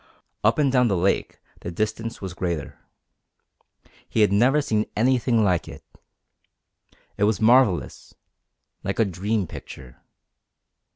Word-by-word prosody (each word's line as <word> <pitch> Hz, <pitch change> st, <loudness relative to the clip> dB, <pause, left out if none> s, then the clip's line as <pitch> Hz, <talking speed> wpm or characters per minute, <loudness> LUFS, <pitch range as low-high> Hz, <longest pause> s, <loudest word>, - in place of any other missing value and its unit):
Up 110 Hz, +2 st, +3 dB
and 145 Hz, -3 st, +2 dB
down 125 Hz, -2 st, +3 dB
the 100 Hz, -4 st, 0 dB
lake 95 Hz, +3 st, 0 dB, 0.2 s
the -, -, -6 dB
distance 110 Hz, +4 st, -4 dB
was 95 Hz, -2 st, -5 dB
greater. 85 Hz, -4 st, -4 dB, 1.3 s
He 110 Hz, -, +1 dB
had 105 Hz, -, +4 dB
never 125 Hz, +8 st, +3 dB
seen 110 Hz, -7 st, -1 dB
anything 120 Hz, 0 st, +2 dB
like 90 Hz, -4 st, +1 dB
it. -, -, -11 dB, 1.3 s
It 105 Hz, -, +2 dB
was 105 Hz, -2 st, +1 dB
marvellous 115 Hz, -4 st, +2 dB, 0.7 s
like 100 Hz, 0 st, -3 dB
a 115 Hz, -, +3 dB
dream 100 Hz, +3 st, -2 dB
picture. 65 Hz, -6 st, -11 dB
105 Hz, 125 wpm, -23 LUFS, 95-115 Hz, 1.3 s, had